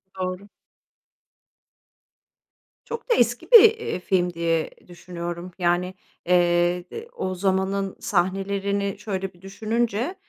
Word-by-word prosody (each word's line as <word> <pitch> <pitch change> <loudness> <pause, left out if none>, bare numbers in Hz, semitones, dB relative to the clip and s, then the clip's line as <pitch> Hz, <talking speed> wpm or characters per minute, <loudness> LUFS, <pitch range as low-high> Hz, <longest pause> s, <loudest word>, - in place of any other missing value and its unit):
Doğru. 185 +2 -4 2.4
Çok 470 0 -7
da - - +5
eski - - 0
bir, 465 -3 +11
eee, 450 - +2
film 180 -1 0
diye 165 -1 0 0.2
düşünüyorum 175 0 -7
yani, 175 +1 +1 0.3
eee, 175 0 +2
d 455 +1 -7
o 185 0 -3
zamanın 190 +1 -1
sahnelerini 195 +1 -1
şöyle 195 -3 -4
bir 175 - -23
düşününce, 225 - -2
190 Hz, 105 wpm, -24 LUFS, 175-200 Hz, 2.4 s, bir